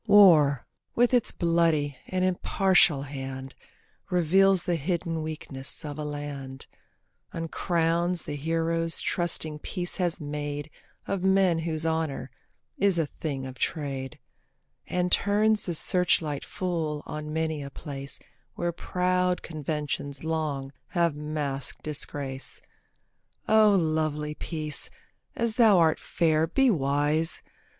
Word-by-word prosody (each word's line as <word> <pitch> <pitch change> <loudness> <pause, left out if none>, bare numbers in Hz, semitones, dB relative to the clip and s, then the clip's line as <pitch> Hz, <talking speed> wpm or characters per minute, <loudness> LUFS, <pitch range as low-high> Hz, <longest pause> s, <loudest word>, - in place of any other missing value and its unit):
War, 165 - +6 0.3
with 245 +2 +3
its 245 -3 +4
bloody 165 -4 +1
and 185 0 0
impartial 185 -4 +3
hand, 135 -1 -6 0.6
Reveals 185 +2 +4
the 175 - 0
hidden 165 0 -1
weakness 155 -3 -3
of 145 0 -6
a - - -2
land, 145 -3 -6 0.7
Uncrowns 170 +1 0
the 145 - -5
heroes 165 +2 0
trusting 160 -3 0
Peace 175 +2 -2
has 175 -3 0
made 145 0 -4 0.3
Of 195 -2 -2
men 190 -3 +3
whose 160 -1 -2
honour 160 -5 -1 0.5
is 195 -3 +3
a 165 - +2
thing 140 -2 -5
of 130 -1 -9
trade, 135 -5 -3 0.7
And 180 0 0
turns 210 +1 +3
the 175 - -1
searchlight 160 -5 +2
full 165 -6 -3
on 150 0 -6
many 160 -1 -1
a 140 - -6
place 140 -1 -7 0.4
Where 175 0 -1
proud 180 +1 0
conventions 150 -2 -4
long 155 -4 -2 0.2
have 170 -4 +1
masked 145 -3 -3
disgrace. 140 -3 -3 0.9
O 215 -2 +6
lovely 155 -3 0
Peace! 155 -1 -2 0.5
as 235 -1 -1
thou 220 -5 +6
art 160 -2 +4
fair 160 -1 +1
be 265 +9 +3
wise. 145 +1 +1
160 Hz, 120 wpm, -27 LUFS, 145-180 Hz, 0.9 s, War